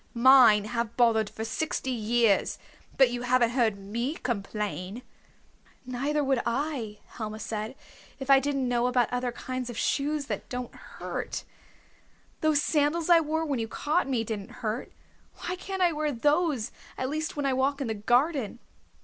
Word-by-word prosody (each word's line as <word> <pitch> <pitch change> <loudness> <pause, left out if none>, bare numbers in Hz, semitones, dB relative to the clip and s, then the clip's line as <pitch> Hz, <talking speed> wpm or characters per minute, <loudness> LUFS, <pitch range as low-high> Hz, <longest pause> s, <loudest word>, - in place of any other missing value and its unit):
Mine 235 -4 +7
have 235 0 -3
bothered 225 -3 +3
for 220 - -5
sixty 265 +2 -2
years, 230 -2 +2 0.4
but 265 -3 +6
you 245 0 -3
haven't 245 -1 +3
heard 235 -5 +2
me 235 +9 -3
complain." 210 - -4 0.8
"Neither 275 +4 -1
would 270 -3 +2
I," 235 -4 -2
Helma 215 -1 -6
said, 220 +2 -4 0.4
"if 270 - -7
I 275 -1 +7
didn't 275 -1 -1
know 245 0 +2
about 245 -2 +1
other 245 0 0
kinds 255 0 -5
of 240 - -6
shoes 290 +3 0
that - - -5
don't 250 -1 -5
hurt. - - -6 1.0
Those 310 -2 +3
sandals 315 +3 +1
I 340 - +8
wore 320 +1 -1
when 280 -5 -1
you 225 - -2
caught 295 +5 0
me 245 -4 +1
didn't 215 -2 -6
hurt. 220 +4 -2 0.5
Why 360 - -1
can't 380 0 -3
I 350 - +4
wear 305 -1 -1
those, 290 -1 +1 0.3
at 260 - -1
least 310 +3 -3
when 290 - -1
I 270 - +2
walk 270 +2 +1
in 275 - -2
the 225 - -1
garden?" 245 - +1
250 Hz, 165 wpm, -28 LUFS, 230-290 Hz, 1.0 s, I